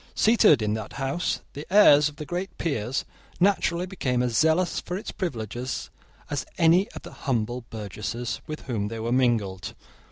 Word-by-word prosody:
Seated 220 Hz, -, +5 dB
in 105 Hz, 0 st, 0 dB
that 110 Hz, -1 st, -5 dB
house, 140 Hz, +6 st, -1 dB
the 145 Hz, +5 st, -9 dB
heirs 150 Hz, -8 st, +7 dB
of 145 Hz, -, -15 dB
the 150 Hz, -, -7 dB
great 180 Hz, +4 st, -4 dB
peers 130 Hz, -6 st, -1 dB, 0.3 s
naturally 180 Hz, -2 st, +2 dB
became 130 Hz, -10 st, -1 dB
as 120 Hz, -2 st, -1 dB
zealous 160 Hz, +5 st, +3 dB
for 180 Hz, -, -4 dB
its 205 Hz, -, -6 dB
privileges 125 Hz, -, -4 dB, 0.4 s
as -, -, -2 dB
any 175 Hz, +6 st, +4 dB
of -, -, -9 dB
the -, -, -10 dB, 0.2 s
humble 120 Hz, 0 st, -1 dB
burgesses 110 Hz, +2 st, -4 dB
with 155 Hz, 0 st, -5 dB
whom 110 Hz, -6 st, -2 dB
they 115 Hz, +1 st, -5 dB
were 115 Hz, +1 st, -2 dB
mingled. 115 Hz, -7 st, +1 dB
130 Hz, 165 wpm, -26 LUFS, 115-175 Hz, 0.4 s, heirs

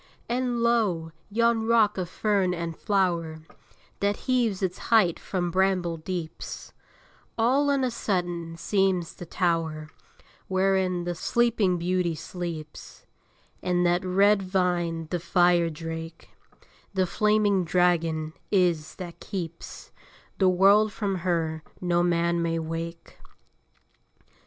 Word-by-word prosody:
And, 245 Hz, -1 st, -1 dB
lo! 205 Hz, -9 st, +1 dB, 0.2 s
yon 230 Hz, +1 st, +2 dB
rock 225 Hz, -3 st, +4 dB
of 180 Hz, -2 st, -3 dB
fern 195 Hz, -3 st, +1 dB
and 170 Hz, -1 st, -4 dB
flower, 170 Hz, -6 st, 0 dB, 0.6 s
That 200 Hz, 0 st, 0 dB
heaves 235 Hz, -7 st, +1 dB
its 185 Hz, -1 st, -2 dB
height 215 Hz, -8 st, +4 dB
from 175 Hz, -2 st, -2 dB
bramble 185 Hz, -2 st, +1 dB
deeps, 165 Hz, -1 st, -6 dB, 0.6 s
All 265 Hz, +6 st, +3 dB
on 280 Hz, -2 st, +2 dB
a 255 Hz, -, 0 dB
sudden 175 Hz, -6 st, -2 dB
seems 190 Hz, -2 st, 0 dB
the 175 Hz, -, -10 dB
tower 165 Hz, -3 st, -1 dB, 0.6 s
Wherein 190 Hz, -1 st, +1 dB
the 175 Hz, 0 st, -2 dB
Sleeping 210 Hz, 0 st, +1 dB
Beauty 175 Hz, -1 st, 0 dB
sleeps: 160 Hz, -2 st, -7 dB, 0.6 s
And 180 Hz, 0 st, +1 dB
that 175 Hz, +1 st, +2 dB
red 195 Hz, +2 st, +3 dB
vine 175 Hz, -3 st, -1 dB
the 175 Hz, -, 0 dB
fire 175 Hz, 0 st, +3 dB
drake, 165 Hz, +1 st, -7 dB, 0.6 s
The 190 Hz, -1 st, +2 dB
flaming 210 Hz, 0 st, +2 dB
dragon, 165 Hz, -3 st, +1 dB, 0.2 s
is, 175 Hz, -6 st, +1 dB
that 175 Hz, -3 st, -8 dB
keeps 170 Hz, -5 st, -7 dB, 0.5 s
The 190 Hz, -2 st, +5 dB
world 200 Hz, +4 st, +5 dB
from 195 Hz, -2 st, -2 dB
her 165 Hz, -3 st, -1 dB, 0.2 s
no 175 Hz, -1 st, +1 dB
man 170 Hz, 0 st, +1 dB
may 165 Hz, 0 st, 0 dB
wake. 165 Hz, +1 st, -6 dB
180 Hz, 120 wpm, -26 LUFS, 170-200 Hz, 0.6 s, The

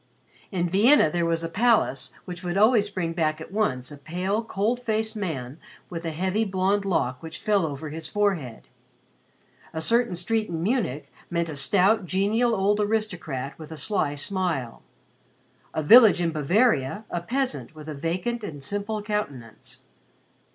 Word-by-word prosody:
In 175 Hz, -3 st, 0 dB
Vienna 205 Hz, -, +5 dB
there 170 Hz, 0 st, 0 dB
was 165 Hz, 0 st, 0 dB
a -, -, -1 dB
palace 215 Hz, -, +2 dB
which 180 Hz, 0 st, -7 dB
would 175 Hz, +1 st, -2 dB
always 215 Hz, 0 st, +4 dB
bring 180 Hz, -4 st, -3 dB
back 155 Hz, -2 st, 0 dB
at 160 Hz, -, -9 dB
once 135 Hz, -, -1 dB
a 145 Hz, -, -10 dB
pale 185 Hz, +8 st, -2 dB
cold 225 Hz, +3 st, -1 dB
faced 220 Hz, -2 st, -1 dB
man 155 Hz, -, -4 dB, 0.3 s
with 170 Hz, -1 st, -5 dB
a -, -, -1 dB
heavy 185 Hz, +7 st, 0 dB
blonde 195 Hz, 0 st, 0 dB
lock 130 Hz, -9 st, 0 dB
which 160 Hz, 0 st, -7 dB
fell 200 Hz, -5 st, +1 dB
over 145 Hz, +1 st, -6 dB
his 160 Hz, +1 st, -6 dB
forehead. 180 Hz, -, -1 dB, 1.1 s
A -, -, -1 dB
certain 230 Hz, +3 st, +2 dB
street 215 Hz, +5 st, -1 dB
in 165 Hz, -1 st, -3 dB
Munich 185 Hz, -, -1 dB, 0.2 s
meant 170 Hz, -1 st, -1 dB
a 155 Hz, -, -5 dB
stout 195 Hz, +7 st, +2 dB
genial 215 Hz, +6 st, +2 dB
old 205 Hz, +1 st, +2 dB
aristocrat 180 Hz, -12 st, -2 dB
with 155 Hz, 0 st, -10 dB
a 160 Hz, -, -7 dB
sly 150 Hz, -6 st, 0 dB
smile; 160 Hz, -, -2 dB, 0.9 s
a 155 Hz, -, -2 dB
village 220 Hz, +3 st, +8 dB
in 170 Hz, -1 st, +1 dB
Bavaria, 175 Hz, -, +1 dB
a 175 Hz, -, -2 dB
peasant 175 Hz, -, -2 dB
with 155 Hz, 0 st, -11 dB
a 155 Hz, -, -4 dB
vacant 180 Hz, +10 st, -3 dB
and 145 Hz, -8 st, -7 dB
simple 205 Hz, +5 st, -2 dB
countenance. 145 Hz, -, -5 dB
180 Hz, 160 wpm, -25 LUFS, 155-210 Hz, 1.1 s, village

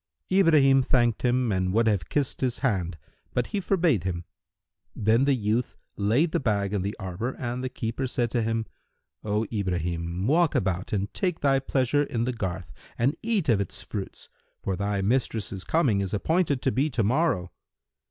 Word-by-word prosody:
Ibrahim 155 Hz, -8 st, +5 dB
thanked 120 Hz, -3 st, +2 dB
him 125 Hz, -1 st, +2 dB
and 95 Hz, -1 st, 0 dB
would 115 Hz, +2 st, +3 dB
have 100 Hz, -7 st, +1 dB
kissed 145 Hz, -3 st, -1 dB
his 125 Hz, -2 st, 0 dB
hand, 90 Hz, -8 st, 0 dB, 0.4 s
but 125 Hz, -, +1 dB
he 205 Hz, -, +1 dB
forbade 170 Hz, -, +2 dB
him. 85 Hz, -2 st, -3 dB, 0.7 s
Then 115 Hz, +5 st, +3 dB
the 140 Hz, -1 st, +3 dB
youth 115 Hz, +1 st, -1 dB, 0.2 s
laid 120 Hz, +11 st, +2 dB
the -, -, +1 dB
bag 105 Hz, -5 st, 0 dB
in 100 Hz, -, 0 dB
the 100 Hz, +3 st, -3 dB
arbour 100 Hz, +6 st, -4 dB
and 125 Hz, 0 st, -3 dB
the 130 Hz, -, -2 dB
keeper 120 Hz, +2 st, -3 dB
said 120 Hz, -2 st, -1 dB
to 120 Hz, -, +1 dB
him, 115 Hz, 0 st, -1 dB, 0.6 s
"O 105 Hz, +1 st, 0 dB
Ibrahim, 90 Hz, -2 st, -2 dB
walk 160 Hz, +5 st, +3 dB
about 95 Hz, -1 st, -1 dB
and 100 Hz, -1 st, -2 dB
take 180 Hz, -3 st, -1 dB
thy 135 Hz, -2 st, +3 dB
pleasure 135 Hz, +1 st, +1 dB
in 120 Hz, -5 st, -1 dB
the 125 Hz, +1 st, -1 dB
garth 95 Hz, -5 st, -4 dB, 0.2 s
and 130 Hz, +6 st, +2 dB
eat 220 Hz, -6 st, 0 dB
of 110 Hz, -6 st, +3 dB
its 100 Hz, -, -6 dB
fruits, 100 Hz, -3 st, -6 dB, 0.4 s
for 95 Hz, -, -1 dB
thy 100 Hz, 0 st, -1 dB
mistress's 105 Hz, -4 st, -1 dB
coming 130 Hz, -12 st, +2 dB
is 100 Hz, +2 st, -2 dB
appointed 155 Hz, -, +1 dB
to 130 Hz, -, +2 dB
be 140 Hz, +5 st, +1 dB
to 120 Hz, -5 st, 0 dB
morrow." 120 Hz, -, +1 dB
115 Hz, 180 wpm, -26 LUFS, 100-135 Hz, 0.7 s, Ibrahim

